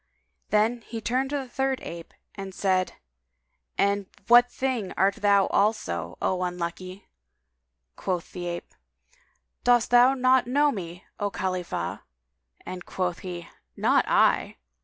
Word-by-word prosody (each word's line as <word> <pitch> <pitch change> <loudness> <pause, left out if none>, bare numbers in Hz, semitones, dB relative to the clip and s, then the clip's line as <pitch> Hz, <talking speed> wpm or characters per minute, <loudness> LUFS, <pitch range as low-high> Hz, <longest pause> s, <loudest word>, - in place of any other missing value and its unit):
Then 220 +3 +2
he 225 +1 -7
turned 255 +4 0
to 290 - -1
the 270 -2 -5
third 265 +1 -1
ape 170 -1 -8 0.2
and 195 -2 -8
said, 185 -2 +1 0.8
"And 200 -1 +1 0.2
what 240 +1 +7
thing 250 -7 -2
art 195 +1 +2
thou 200 -1 +4
also, 85 - 0
O 185 -1 0
unlucky?" 180 +2 -4 0.9
Quoth 180 -3 -3
the 175 -1 -5
ape, 175 0 -6 0.9
"Dost 240 -1 +3
thou 245 +2 +6
not 255 -1 +3
know 290 +3 +3
me, 180 -6 -7
O 205 - 0
Khalifah!"; 185 -2 -3 0.7
and 180 -1 -6
quoth 180 -2 -2
he, 175 -2 -7 0.3
"Not - - +3
I!" - - +3
200 Hz, 130 wpm, -26 LUFS, 180-245 Hz, 0.9 s, what